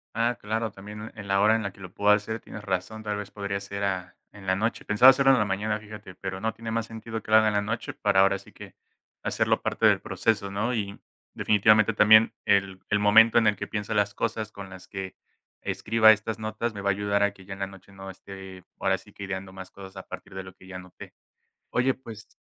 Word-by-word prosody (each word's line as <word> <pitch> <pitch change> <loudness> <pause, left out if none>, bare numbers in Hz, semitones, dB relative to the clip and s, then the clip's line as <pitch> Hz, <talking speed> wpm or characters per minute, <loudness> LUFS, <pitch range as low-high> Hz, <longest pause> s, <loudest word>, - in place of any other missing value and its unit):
Ah, 120 +1 +1
claro, 110 +2 -2
también 105 +2 -9
en 105 -2 -9
la 100 0 +2
hora 110 +2 +5
en 115 - -1
la 100 - -3
que 95 - -18
lo 90 -1 -10
puedo 105 - +1
hacer. 110 +2 -1
Tienes 110 - -10
razón, 95 +3 -3
tal 105 -1 -2
vez 105 -1 -6
podría 100 -1 -3
ser 100 0 -6
a 90 -3 -2 0.2
en 100 -2 -13
la 95 0 +2
noche, 110 +4 -2
pensaba 105 +5 +7
hacerlo 135 0 +5
en 130 - +4
la 105 - +2
mañana, 105 +2 -1
fíjate, 105 -3 -11
pero 95 +1 -6
no, 110 0 -1
tiene 115 0 -7
más 115 0 -1
sentido 115 0 -7
que - - -9
lo 110 - +8
haga 110 0 +5
en 105 - +1
la 105 - +2
noche 115 +3 -4
para 95 - +1
ahora 100 0 +4
sí 100 - -16
que - - -13 0.5
hacerlo - - +1
parte - - 0
del - - +4
proceso, 105 -3 -1
¿no?, 105 +5 -1
y 100 -2 -4 0.3
definitivamente 110 +1 +4
también 110 +2 +6
el 95 -1 +2
el 105 - +2
momento 110 +3 +6
en 115 -2 +5
el 105 - +3
que - - -6
piensa 105 0 -3
las 105 -1 +1
cosas 110 -1 -3
con 100 -2 -9
las 95 -1 -12
que 95 -1 -6 0.5
escriba 110 0 +4
estas 110 +1 -1
notas 110 +2 -3
me 100 - -6
va 100 - 0
a - - +5
ayudar 100 +1 0
a 100 - +2
que 95 -2 -16
ya 95 - -7
en 95 - -10
la 95 - -2
noche 95 0 -15
no 95 0 -9
esté, 95 -1 -11 0.2
ahora - - +1
sí - - -18
que - - -9
ideando 95 -1 -5
más 95 -1 -10
cosas 95 -1 -12
a 95 - -8
partir 95 +1 -9
de 95 - -5
lo 95 0 -12
que 95 - -18
ya 95 - -9
anoté. 90 -1 -11 0.6
Oye, 130 +2 +2
pues, 115 -5 -11
105 Hz, 250 wpm, -26 LUFS, 95-110 Hz, 0.6 s, lo